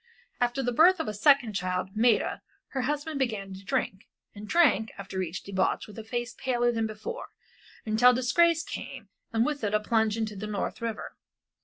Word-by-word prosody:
After 245 +2 0
the 245 - 0
birth 345 +8 +5
of 320 - -2
a 215 - -2
second 245 +1 +4
child, 185 -1 -2
Maida, 225 0 +2 0.3
her 265 - -2
husband 295 +2 -2
began 210 -7 -2
to 190 +1 -10
drink, 215 -3 -2 0.3
and 210 0 -9
drank, 245 - +3
after 190 -1 -4
each 180 0 -4
debauch 190 -1 0
with 210 0 -11
a - - -6
face 240 +2 -4
paler 240 -2 +1
than 225 -1 -1
before, 220 - -6 0.6
until 225 +3 +5
disgrace 325 +7 +3
came - - -8 0.2
and 225 0 +2
with 290 -3 -2
it 210 0 +1
a - - +4
plunge 220 0 +1
into 220 -2 -2
the 205 +2 -5
North 210 +1 -3
River. 230 -1 -5
225 Hz, 185 wpm, -28 LUFS, 210-260 Hz, 0.6 s, birth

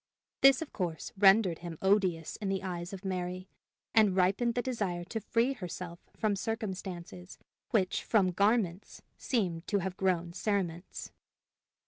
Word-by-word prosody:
This, 275 +2 +7
of 315 - -14
course, 170 -5 -3
rendered 195 -3 +5
him 170 -2 -7
odious 190 -5 +1
in 205 -3 -3
the 195 0 -1
eyes 175 -2 -4
of 195 0 -8
Mary, 185 0 -3 0.5
and 210 -4 +5
ripened 200 +6 +2
the 245 - +1
desire 200 -9 -2
to 225 +6 -4
free 235 +5 +1
herself 180 -5 -7 0.2
from 215 -2 +1
circumstances 190 -4 -5 0.3
which 190 -5 +1
from 195 -5 +3
garments 200 -1 0
seemed 180 -9 -1
to 205 - +1
have 190 -1 -3
grown 175 -3 0
cerements. 185 -4 -2
190 Hz, 140 wpm, -31 LUFS, 175-215 Hz, 0.5 s, This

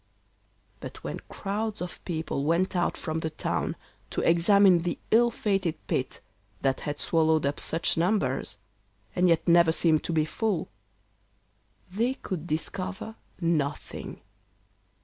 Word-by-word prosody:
But - - -9
when - - -4
crowds 210 +2 -3
of 180 0 -6
people 160 -5 -2
went 170 +5 +1
out 175 - +1
from 160 0 -2
the 160 - -2
town 155 - -2 0.3
to - - -2
examine 180 +2 +5
the 175 0 -2
ill 235 +2 +6
fated 195 -7 0
pit 130 - -2 0.4
that 135 -1 +1
had 145 0 -4
swallowed 160 -2 +2
up 140 +1 -1
such 165 0 +1
numbers, 165 - 0 0.6
and 180 0 +4
yet 165 0 +2
never 170 -1 +6
seemed 160 -1 +3
to - - -1
be 155 -2 +2
full, 205 +1 -1 1.2
they 235 +7 0
could 175 - -5
discover 185 +6 -3 0.3
nothing. 160 -5 -2
170 Hz, 130 wpm, -27 LUFS, 160-195 Hz, 1.2 s, ill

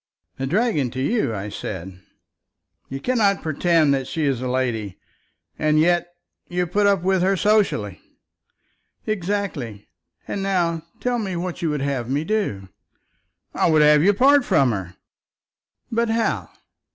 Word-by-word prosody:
"A 135 - -2
dragon 185 - +1
to 130 - -6
you, 210 - 0
I 100 +1 -5
said." 95 -2 -7 0.9
"You 135 - -5
cannot 210 - +1
pretend 160 -1 +2
that 135 -1 -1
she 160 -2 -2
is 135 -4 0
a 130 - -2
lady, 120 -6 -2 0.6
and 155 0 +2
yet 175 +2 +3 0.4
you 180 0 0
put 200 +4 +1
up 195 -3 +2
with 190 0 +2
her 190 +1 +2
society." 200 - +1 1.0
"Exactly. 180 - -3 0.4
And 200 - -3
now 175 -4 0 0.2
tell 245 -1 -1
me 195 -4 -3
what 175 +1 -4
you 165 - 0
would 150 -2 -2
have 135 -4 -2
me 140 +3 0
do." 160 - -2 0.8
"I - - +2
would 155 -1 +5
have 150 0 +6
you 200 +4 +4
part 275 +5 +5
from 135 - +3
her." 95 -4 -5 1.0
"But 230 0 +1
how? 225 0 0
165 Hz, 150 wpm, -22 LUFS, 130-200 Hz, 1.0 s, have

